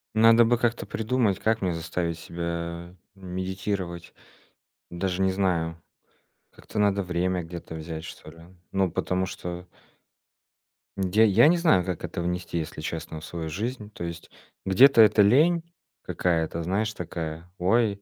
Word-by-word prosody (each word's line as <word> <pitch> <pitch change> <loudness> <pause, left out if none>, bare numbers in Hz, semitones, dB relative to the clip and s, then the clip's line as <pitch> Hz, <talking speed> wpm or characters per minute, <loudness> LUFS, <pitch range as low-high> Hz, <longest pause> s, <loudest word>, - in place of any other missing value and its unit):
Надо 115 +1 +7
бы 120 +1 +3
как-то 120 0 0
придумать, 110 -3 0
как 110 -1 +1
мне 90 -2 0
заставить 85 0 -3
себя 85 +1 -5 0.2
медитировать. 95 -1 -4 0.8
Даже 90 +1 -2
не 95 0 +3
знаю. 85 -4 -1 0.7
Как-то - - -9
надо 100 -1 +2
время 90 0 -1
где-то 85 -1 -8
взять, 80 0 -6
что 75 - -10
ли. 85 - -16 0.3
Ну 95 -2 +1
потому 90 +2 -1
что 90 -1 -7 1.3
М, 95 -1 -1
я 110 +2 +5
я 110 +7 +6
не 175 - +4
знаю, 160 - +4
как 90 -3 -4
это - - -4
внести, 90 0 -3
если 80 -1 -4
честно, 80 0 -5
в - - -10
свою 80 -2 -5
жизнь. 105 +4 -4
То 95 - -8
есть 85 -1 -7 0.4
где-то 115 +6 +7
это 105 -1 +6
лень 155 +11 +4 0.4
какая-то, 85 -1 -1
знаешь, 105 +6 -1
такая: 85 -1 -6
"Ой 100 +2 +2
90 Hz, 145 wpm, -26 LUFS, 85-105 Hz, 1.3 s, Надо